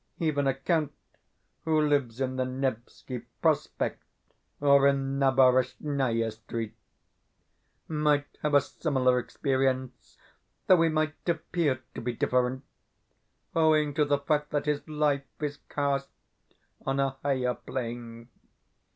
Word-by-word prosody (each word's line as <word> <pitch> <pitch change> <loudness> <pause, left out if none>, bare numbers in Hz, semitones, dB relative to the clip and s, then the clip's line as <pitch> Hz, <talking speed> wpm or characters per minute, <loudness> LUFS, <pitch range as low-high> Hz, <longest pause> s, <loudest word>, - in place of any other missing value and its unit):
Even 145 -4 0
a 135 - +2
count 150 +1 0 0.7
who 160 -1 +2
lives 140 -6 +1
in 130 -1 -1
the 130 - 0
Nevski 130 -1 -4 0.2
Prospect - - 0 0.6
or 140 -1 +5
in 135 0 0
Naberezhnaia 130 -2 +2
Street 110 0 -6 1.1
might 150 -2 +2 0.2
have 150 -1 +1
a 140 - +7
similar 130 -3 +1
experience, 130 -1 -2 0.5
though 185 -3 +6
he 165 - +4
might 155 0 0 0.2
APPEAR 160 -5 0
to - - -6
be 120 +1 -2
different, 125 +2 0 0.9
owing 155 -2 +3
to 150 +1 +3
the 145 -1 +2
fact 150 +1 0
that 145 -1 -1
his 150 -1 0
life 150 -2 +1 0.2
is 150 -1 -3
cast 140 -1 0 0.8
on 135 +1 -1
a 135 -1 +2
higher 130 -3 +1
plane. 115 -2 -6
140 Hz, 120 wpm, -28 LUFS, 130-150 Hz, 1.1 s, a